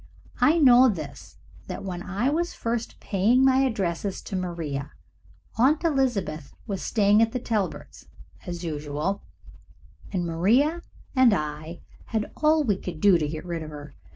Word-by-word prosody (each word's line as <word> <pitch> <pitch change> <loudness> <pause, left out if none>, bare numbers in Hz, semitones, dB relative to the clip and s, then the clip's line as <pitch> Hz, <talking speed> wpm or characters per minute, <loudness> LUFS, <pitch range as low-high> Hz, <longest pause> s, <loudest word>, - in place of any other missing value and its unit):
I 315 +3 +4
know 255 -4 +7
this, 155 -9 -7 0.3
that - - -6
when 180 -2 -5
I 205 +9 -1
was 345 +3 -1
first 230 0 -3
paying 225 +7 +2
my 260 -1 +5
addresses 200 -7 -1
to - - -6
Maria, 160 -6 -4 0.7
Aunt 290 +7 +4
Elizabeth 240 - -1
was 200 -4 -4
staying 210 -1 +3
at 225 0 +2
the 250 - -1
Talberts' 215 -5 -4 0.4
as 175 0 -5
usual, 155 +4 -3 0.9
and 180 -3 -1
Maria 235 - +2 0.3
and 255 -5 +5
I 155 +1 -5 0.2
had 220 -1 -3
all 310 0 +3
we 205 -8 +1
could 180 -4 -7
do 190 -2 +5
to 150 - -1
get 155 +2 -6
rid 170 -2 -4
of 155 - -7
her. 150 -1 -10
200 Hz, 155 wpm, -25 LUFS, 165-250 Hz, 0.9 s, know